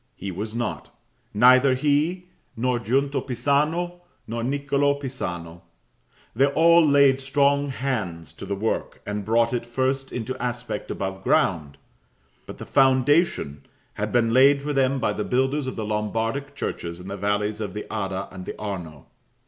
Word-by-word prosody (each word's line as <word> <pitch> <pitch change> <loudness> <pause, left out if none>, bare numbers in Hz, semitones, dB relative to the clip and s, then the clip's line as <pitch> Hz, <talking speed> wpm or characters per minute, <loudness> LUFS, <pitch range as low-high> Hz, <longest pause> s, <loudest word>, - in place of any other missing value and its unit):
He 95 +1 -5
was 105 +5 -5
not: 120 -2 -4 0.4
neither 130 +4 +5
he, 150 +6 +1 0.3
nor 125 +1 0
Giunta 135 +4 0
Pisano, 150 +8 0 0.2
nor 115 +1 -4
Niccolo 140 +2 +1
Pisano. 90 -11 -6 0.7
They 135 +4 +4
all 170 +3 +5
laid 140 -2 +4
strong 140 +1 +2
hands 110 -12 -3
to 100 - -9
the 100 - -2
work, 110 +3 -3
and 105 0 -3
brought 115 +3 +2
it 120 - -1
first 130 +3 -1
into 125 +1 -4
aspect 120 -3 -4
above 95 0 -4
ground; 75 -6 +1 0.7
but - - -8
the - - -8
foundation 130 - +2 0.3
had 105 +1 -3
been 115 -2 +2
laid 140 +2 +5
for 150 0 -2
them 135 0 +2
by 105 - 0
the 105 - -3
builders 130 +4 0
of 130 - -4
the 110 - -4
Lombardic 115 +6 -2
churches 85 -9 -4
in 90 - -10
the 100 - -4
valleys 105 +2 -1
of 100 -3 -5
the 105 - -5
Adda 95 -2 -3
and 95 -1 -9
the - - -6
Arno. 90 -9 -6
125 Hz, 155 wpm, -24 LUFS, 105-140 Hz, 0.7 s, neither